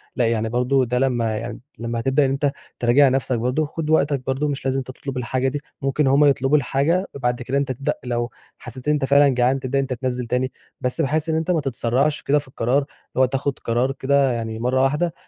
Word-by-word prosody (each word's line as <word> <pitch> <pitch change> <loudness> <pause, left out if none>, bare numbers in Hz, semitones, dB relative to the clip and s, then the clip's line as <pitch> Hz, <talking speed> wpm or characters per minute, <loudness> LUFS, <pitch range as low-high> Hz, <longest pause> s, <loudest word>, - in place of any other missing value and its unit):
لأ 125 - +2
يعني 115 -1 0
برضه 125 +3 +2
ده 125 +1 0
لمّا 120 -4 +1
يع 120 +2 -5 0.3
لمّا 115 0 -3
هتبدأ 135 +4 +2
إن - - +1
أنت 140 +1 +1 0.3
تراجع 130 +4 +5
نفسك 130 -1 0
برضه 125 +6 0
خد 155 +1 -5
وقتك 145 -4 +2
برضه 135 +3 0
مش 140 -2 -4
لازم 135 0 +1
تطلب 130 +1 -7
الحاجة 130 +1 -1
دي، 140 +2 -2 0.2
ممكن 135 +1 +1
هُم 140 +2 +5
يطلبوا 140 +1 +3
الحاجة 150 +7 +1
بعد 125 -2 -1
كده 130 +3 -1
أنت 140 -1 0
تبدأ 135 +2 -1
لو 120 -1 -2 0.3
حسيت 125 +2 -8
إن 150 - +4
أنت 145 -2 0
فعلًا 140 +1 +5
جعان 130 +1 +2
تبدأ 130 +1 -1
إن - - +3
أنت 135 -1 -3
تنزِّل 125 -1 -3
تاني 125 +2 0 0.3
بس 125 +5 0
بحيث 155 +2 0
إن 160 - +1
أنت 160 +3 0
ما 165 -3 +2
تتسرّعش 135 +2 0
كده 145 +1 +2
في 145 - -10
القرار، 130 0 0
اللي 140 -1 0 0.3
هو - - +7
تاخد 135 +1 -2
قرار 120 +3 0
كده 135 0 +2
يعني 115 -2 -3
مرّه 130 +3 +1
وحدة 150 +5 +1
135 Hz, 225 wpm, -22 LUFS, 125-140 Hz, 0.3 s, هو